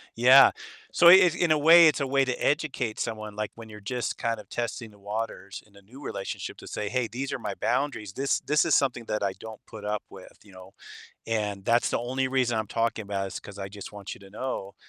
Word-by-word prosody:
Yeah. 130 +4 +7 0.4
So 170 - +5
it 180 -2 +7
in 175 -3 +1
a 155 - +5
way, 165 +3 +8
it's 155 - +2
a 140 - 0
way 135 0 +2
to 125 -1 -2
educate 135 -6 -1
someone, 110 -2 -4
like, 105 0 -3
when 115 -1 -11
you're, 105 -1 -10
just, 120 +4 -3
kind 115 -1 -2
of, 105 - -13
testing 115 -1 -4
the 105 - -20
waters 105 -1 -5
in 105 -1 -25
a 100 - -16
new 120 +8 -15
relationship 100 - -5
to - - -12
say, 105 -1 -4
"Hey, 125 +1 -1
these 130 +3 -4
are - - -3
my - - -4
boundaries. 120 -9 -2
This 135 +4 0
this 150 +2 +2
is 165 - +3
something 125 -4 0
that 105 -1 -2
I 100 -1 0
don't 110 -1 -10
put 105 -2 -10
up 105 0 -2
with, 95 -1 -14
you 105 - -18
know, 95 +1 -14 0.5
and 105 -3 -2
that's 120 +3 +2
the - - 0
only 130 +2 -2
reason 125 -3 +1
I'm 110 - -2
talking 115 +1 -1
about 100 -1 -3
it 95 - -7
is - - -5
'cause 100 - -12
I, 95 -1 -5
just, 100 +1 -10
want 100 -2 -7
you - - -17
to 100 -1 -15
know 105 -3 -5
115 Hz, 245 wpm, -27 LUFS, 105-130 Hz, 0.5 s, way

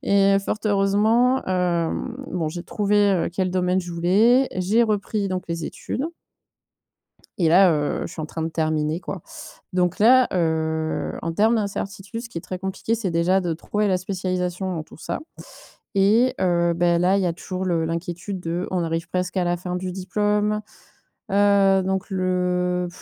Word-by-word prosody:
et 200 0 +4
fort 210 - -2
heureusement, 215 +6 +3
hem, 180 +5 -1 0.2
bon 165 -4 -1
j'ai 170 +2 -6
trouvé, 210 0 0 0.2
heu, 175 -3 0
quel 185 0 -1
domaine 180 0 +1
je 175 -1 -7
voulais, 215 +10 +4
j'ai 200 +6 +2
repris 205 -1 -1
donc 185 -1 -3
les 170 0 -3
études. 265 - -4 1.3
Et 170 -4 +3
là, 180 +2 +6
heu, 150 -1 -1
je - - -10
suis - - -7
en 155 - -3
train 160 +1 -5
de 160 - -1
terminer, 155 0 -1
quoi 185 -2 -6 0.5
donc 180 -1 +1
là, 250 +3 +6
heu, 160 -2 -1
en 165 0 -2
termes 220 +6 +3
d'incertitude, 205 +1 -4
ce 235 - -9
qui 175 - -7
est - - -4
très 185 +1 -6
compliqué, 190 +4 -2
c'est 220 -5 -2
déjà 175 +3 +2
de 175 -2 -1
trouver 205 +6 -1
la 185 - +2
spécialisation 185 0 -2
dans 160 - -4
tout - - -16
ça - - -4 0.8
et 225 +6 +4
heu, 170 -2 +2
bah, 170 0 +2
là, 180 +3 +3
il 200 - +1
y - - +1
a 170 - +1
toujours 185 +2 -5
le 170 -3 0
l'inquiétude 175 +4 -4
de: 175 +2 -3
on 180 -2 0
arrive 165 +1 -3
presque 180 +1 -2
à 185 - +2
la 175 0 0
fin 180 +1 -5
du 185 0 -4
diplôme. 210 +3 0 0.7
Heu 200 -1 +4
donc 190 +2 -2
le 180 -1 0
185 Hz, 180 wpm, -23 LUFS, 170-200 Hz, 1.3 s, là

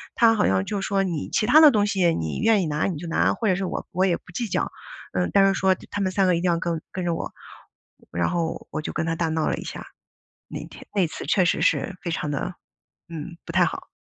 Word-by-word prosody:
他 230 -1 +5
好 210 - +2
像 95 0 +2
就 200 -2 -3
说： 195 -1 +1
“你 170 -6 -3
其 215 - +1
他 280 +7 +7
的 310 - +10
东 210 -4 +2
西 185 -5 +2
你 80 -1 -3
愿 220 -2 +4
意 165 - -2
拿 150 0 0
你 180 -5 -2
就 170 +3 -7
拿， 165 - +2
或 225 - -2
者 185 - +3
是 195 - -2
我 - - -4
我 185 +2 +2
也 175 - +2
不 - - -30
计 235 +6 -2
较， 190 - -1 0.4
嗯， 90 -1 0
但 195 -1 +6
是 195 - +3
说 190 -1 +2 0.2
他 205 - -3
们 185 -1 0
3 195 0 +2
个 180 - +4
一 170 - -1
定 180 - +1
要 170 - +1
跟 165 -2 -2
跟 185 - -4
着 170 - +1
我。” - - -4 0.8
然 85 - +1
后 170 -2 -2
我 155 - -3
就 - - -5
跟 - - -1
他 165 - -1
大 165 0 0
闹 160 -1 0
了 - - +1
一 - - -6
下， - - -7 0.6
那 - - -6
天 - - -13
那 190 - +3
次 - - -7
确 180 +5 +3
实 - - +1
是 195 - +1
非 175 - -4
常 150 -2 -2
的， 145 +5 -3 0.5
嗯， 170 +1 -7
不 - - -6
太 - - +4
好。 - - -4
180 Hz, 285 characters per minute, -24 LUFS, 165-195 Hz, 0.8 s, 的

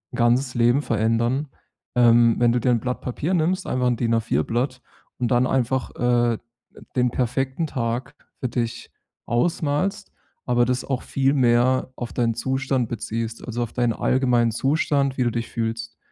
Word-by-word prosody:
ganzes 125 +2 +2
Leben 120 +4 +3
verändern. 115 +5 0 0.5
Ähm, 120 -1 +5
wenn 120 -1 +4
du 125 - +1
dir 125 +2 +2
‘n 120 - +2
Blatt 125 +2 -3
Papier 145 +8 -2
nimmst, 180 +2 +1
einfach 125 0 0
‘n 120 - +1
DIN-A4-Blatt 115 - 0 0.4
und 120 -2 0
dann 125 +1 +3
einfach, 130 0 0
äh, 120 -1 +2 0.6
den 125 -1 +3
perfekten 130 +5 -1
Tag 125 -2 -3 0.3
für 130 - -2
dich 115 -1 -3 0.3
ausmalst, 165 - -1 0.3
aber 120 -1 +3
das 125 +1 -1
auch 130 -2 -2
viel 135 0 +1
mehr 130 0 +2
auf 120 - -6
deinen 115 -2 0
Zustand 130 0 -1
beziehst, 115 0 -4
also 120 0 -2
auf 115 - -7
deinen 120 -2 +1
allgemeinen 125 -2 +2
Zustand, 140 +2 +1
wie 130 - +2
du 120 - +1
dich 115 0 -3
fühlst. 115 0 -4
125 Hz, 155 wpm, -23 LUFS, 115-130 Hz, 0.6 s, Ähm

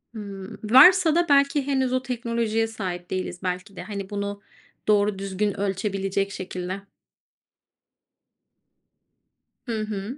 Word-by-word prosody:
Hıı, 200 0 -7
varsa 315 - +7
da 345 -2 +2
belki 280 0 +3
henüz 265 -2 +1
o 255 - +1
teknolojiye 230 -2 -1
sahip 180 -5 -5
değiliz 185 -1 -3
belki 185 +2 -4
de. - - -7
Hani, 200 -2 -6
bunu 200 0 -4 0.5
doğru 205 -1 +3
düzgün 195 +1 -2
ölçebilecek 195 0 -1
şekilde. 185 +1 -5 2.8
Hı 225 -3 -2
hı. 215 +4 -5
205 Hz, 110 wpm, -25 LUFS, 195-235 Hz, 2.8 s, varsa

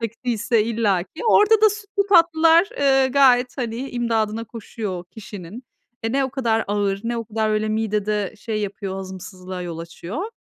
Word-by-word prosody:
çektiyse, 230 -1 0
illaki. 205 -6 -1
Orada 435 0 +5
da 435 - +7
sütlü 405 0 -2
tatlılar, 335 -1 +5
ııı, 270 -2 +3
gayet, 255 -2 +4
hani, 230 -3 -3
imdadına 225 -2 -1
koşuyor 210 -5 -6
kişinin. 205 0 -9 0.4
E, 225 0 -2
ne 275 0 +2
o 265 - -3
kadar 230 -4 0
ağır, 200 -1 0
ne 235 +1 -1
o 230 - -3
kadar 220 0 -1
öyle 215 0 0
midede 210 -2 -1
şey 215 0 -4
yapıyor, 200 -1 -4
hazımsızlığa 185 -1 -7
yol 170 -2 -6
açıyor. 175 - -6
225 Hz, 155 wpm, -22 LUFS, 205-260 Hz, 0.4 s, da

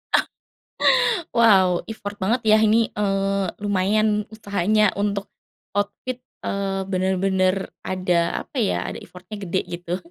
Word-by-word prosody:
Oh. - - +5 1.1
Wow, 190 -6 +4
effort 205 -2 -7
banget 230 +6 +1
ya 215 0 +5
ini, 220 +1 +3
eee, 195 -1 0 0.2
lumayan 210 +2 +1
usahanya 210 0 +2
untuk, 200 -1 -2 0.4
outfit, 205 +5 -3 0.2
eee, 195 -1 -2
bener-bener 190 0 +1 0.2
ada 180 -2 0
apa 265 - -6
ya? 210 - +1
Ada - - -7
effort-nya 185 +3 -10
gede 190 -1 -1
gitu. 175 0 -5
200 Hz, 120 wpm, -23 LUFS, 185-210 Hz, 1.1 s, Oh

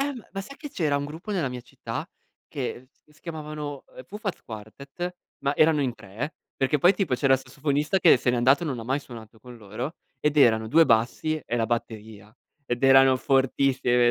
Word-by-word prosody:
Ehm, 275 -5 -3
ma 195 - -4
sai 275 +8 -10
che 295 - -9
c'era 150 - 0
un 140 - -2
gruppo 165 +8 -7
nella 165 -9 0
mia 125 -1 -6
città, - - -7 0.4
che 130 -2 -5 0.2
che 150 - -25
si 150 - -25
chiamavano, 150 -3 -6
ehm, 130 - -9
Fufat 205 - -6
Quartet, 140 +11 -7 0.3
ma 140 +1 0
erano 155 -1 +4
in 130 -3 0
3, 110 +10 -6 0.2
perché 135 +2 +1
poi 180 +6 +5
tipo 180 -9 0
c'era 135 +1 +3
il 130 - +5
sassofonista 145 +6 -1
che 175 -5 +6
se 125 - 0
n'è 125 - 0
andato 130 +7 +4
e - - -2
non 135 -5 -3
mai 135 +3 0
suonato 115 -4 -12
con 125 +1 -12
loro, 115 - -6 0.2
ed 150 0 0
erano 110 -5 +4
2 165 +6 +6
bassi 120 +7 +1
e 120 - -2
la 115 -1 +1
batteria; 110 -3 -5 0.3
ed 120 0 -2
erano 135 0 +7
fortissimi, 130 -2 +2
135 Hz, 200 wpm, -26 LUFS, 120-155 Hz, 0.4 s, erano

